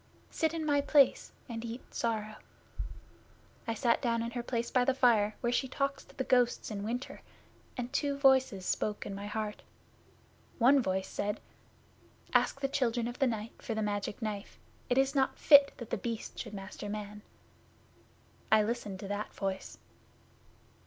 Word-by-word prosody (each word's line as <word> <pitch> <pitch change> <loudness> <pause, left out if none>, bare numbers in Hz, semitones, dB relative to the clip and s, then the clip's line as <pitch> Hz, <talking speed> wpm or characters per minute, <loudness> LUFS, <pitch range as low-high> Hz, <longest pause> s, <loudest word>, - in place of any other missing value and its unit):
Sit 320 -1 0
in 320 -1 -2
my 290 -1 +3
place, 280 -1 +4 0.2
and 230 -2 -5
eat 235 +2 -7
sorrow." 215 -2 -2 1.3
I 230 - -1
sat 235 0 +2
down 230 -2 +1
in 235 - -4
her 240 0 -3
place 235 -1 -2
by 250 - +4
the 260 +1 +2
fire, 220 -5 +4
where 240 0 +1
she 265 - +1
talks 275 +2 -2
to - - -20
the 265 - 0
ghosts 245 -3 +2
in 200 -1 -4
winter, 240 +5 -4 0.6
and 250 +1 -4
two 280 -1 0
voices 265 -8 +4
spoke 210 -1 -1
in 200 - -5
my 200 +1 -6
heart. 210 0 -3 1.0
One 270 +3 +6
voice 190 -3 -1
said, 205 +1 -2 0.9
"Ask 275 - +2
the 275 - +2
Children 240 -4 0
of 240 - -6
the 270 - +4
Night 225 -1 -3
for 225 - -3
the 220 - 0
Magic 205 -1 -2
Knife. 210 -2 -4 0.3
It 245 - +2
is 270 0 +3
not 270 -2 +1
fit 285 -2 +7
that 235 -4 -9
The - - 0
Beast 230 +2 -5
should 210 - -6
master 195 +1 -7
man." 210 0 -6 1.3
I 215 -1 +6
listened 210 -4 -3
to 200 - -5
that 205 +1 -3
voice. 195 -1 -4
235 Hz, 170 wpm, -32 LUFS, 210-265 Hz, 1.3 s, fit